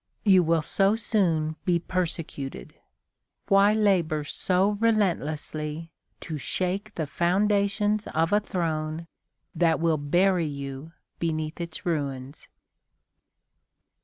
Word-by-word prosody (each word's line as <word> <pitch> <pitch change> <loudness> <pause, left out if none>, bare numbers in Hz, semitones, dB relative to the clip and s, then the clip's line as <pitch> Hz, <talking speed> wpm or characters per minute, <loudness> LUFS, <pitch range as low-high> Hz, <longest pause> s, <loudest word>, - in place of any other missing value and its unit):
You 190 -3 +6
will 165 -2 +2
so 195 +6 +2
soon 165 -9 0
be 180 -3 +2
persecuted. 165 - -4 0.8
Why 195 +1 +6
labor 180 -8 +2
so 185 +6 +1
relentlessly 165 -7 -1 0.3
to 155 -3 -5
shake 190 +7 -2
the 160 - -2
foundations 200 +5 +1
of 165 +4 0
a 205 - +5
throne 165 -5 -3 0.5
that 165 -2 +2
will 165 -1 +2
bury 175 +3 +2
you 140 +1 -6 0.3
beneath 155 0 -2
its 170 +3 -6
ruins? 140 -4 -3
170 Hz, 105 wpm, -26 LUFS, 155-195 Hz, 0.8 s, You